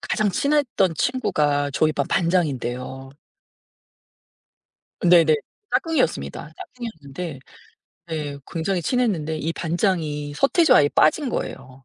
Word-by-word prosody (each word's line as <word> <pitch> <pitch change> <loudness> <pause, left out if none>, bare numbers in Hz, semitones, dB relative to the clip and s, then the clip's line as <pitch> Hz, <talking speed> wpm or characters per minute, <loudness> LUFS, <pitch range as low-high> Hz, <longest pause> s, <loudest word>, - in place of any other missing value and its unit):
가장 215 -2 0
친했던 270 - +1
친구가 145 - 0
저희 155 +2 +2
반 140 - -1
반장인데요. 135 -6 -1 1.9
네네. 170 -3 +6 0.4
짝꿍이었습니다. 160 - -1
짝꿍이었는데 160 - -7 0.7
네 150 -3 -4
굉장히 175 +2 -1
친했는데 175 - 0
이 165 +2 -2
반장이 160 -5 -1
서태지와 325 - +4
아이에 145 - +4
빠진 255 - +3
거예요. 135 - -6
160 Hz, 280 characters per minute, -23 LUFS, 145-195 Hz, 1.9 s, 네네